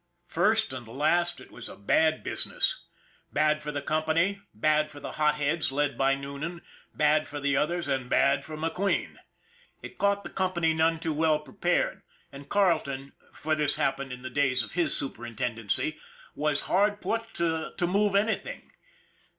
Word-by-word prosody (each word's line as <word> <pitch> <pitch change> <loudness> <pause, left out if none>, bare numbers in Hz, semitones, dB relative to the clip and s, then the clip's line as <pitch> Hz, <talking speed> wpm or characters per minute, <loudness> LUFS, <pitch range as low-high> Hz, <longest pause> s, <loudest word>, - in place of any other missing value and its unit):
First 215 +2 +2
and 125 -3 -7
last 170 +8 +1
it - - -14
was - - -9
a - - -9
bad 155 +10 +2
business. - - -1 0.5
Bad 155 0 +2
for 150 0 -4
the 145 -1 -4
company, 160 +6 +1
bad 155 0 +2
for 145 -1 -11
the - - -6
hot 150 -1 +2
heads 150 +1 0
led 145 -1 0
by 135 +2 +3
Noonan, 140 +5 -6 0.3
bad 150 +1 +2
for 145 - -6
the 140 -1 +1
others, 170 +4 0
and 135 -3 -1
bad 140 +1 +3
for 155 0 -7
McQueen. 165 +5 -1 0.7
It - - -10
caught 200 0 +2
the - - -8
company 175 -4 +1
none 160 +1 +2
too 160 -1 -2
well 155 0 +3
prepared, 175 +4 -1 0.3
and 140 0 -11
Carleton, 155 -9 +1 0.2
for 155 +1 -2
this 150 -2 +2
happened 140 -3 -1
in 125 0 -8
the 130 - -6
days 130 -3 +2
of 110 - -8
his 175 -1 +2
superintendency, 120 +2 -1 0.3
was 150 0 0
hard 205 +2 +2
put 225 +1 -3
to 160 -2 0
it - - -16
to 175 - +1
move 200 +3 +2
anything. 220 - -1
155 Hz, 170 wpm, -28 LUFS, 140-175 Hz, 0.7 s, by